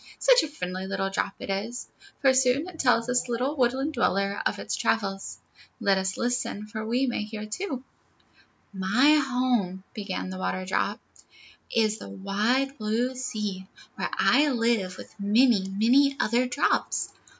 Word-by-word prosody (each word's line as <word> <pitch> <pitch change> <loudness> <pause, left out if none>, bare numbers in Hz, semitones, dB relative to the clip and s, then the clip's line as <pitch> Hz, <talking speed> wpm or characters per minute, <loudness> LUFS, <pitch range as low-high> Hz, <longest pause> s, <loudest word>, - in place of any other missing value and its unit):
Such - - +5
a - - -2
friendly 185 -10 -5
little 195 0 -2
drop 195 - -1
it - - -5
is, 220 +6 -3 0.3
for 270 -1 +5
soon 260 +4 +2
it 355 -3 -11
tells 245 -3 +3
this 250 0 0
little 250 +5 -1
woodland 265 +3 +1
dweller 200 -5 +1
of - - -3
all - - -6
its - - -1
travels. 195 -3 -1 0.4
Let 200 -4 +3
us 190 0 -2
listen, 240 -4 -2
for 220 0 -6
we 240 +4 +1
may 245 -4 -1
hear 215 0 -6
too: 260 - -4 0.9
"My 225 +11 +4
home," 245 -8 0
began 195 -3 -4
the 185 - -6
Waterdrop, 185 +3 -1 0.7
"is 220 -1 +1
in - - -8
the - - -10
wide 230 +8 0
blue 225 +4 0
sea, 210 -7 -4 0.3
where - - -3
I 295 +1 +4
live 230 -7 0
with - - -11
many, 210 0 +3
many 255 +8 +3
other 240 +2 +2
drops. 265 +4 0
230 Hz, 160 wpm, -26 LUFS, 200-255 Hz, 0.9 s, Such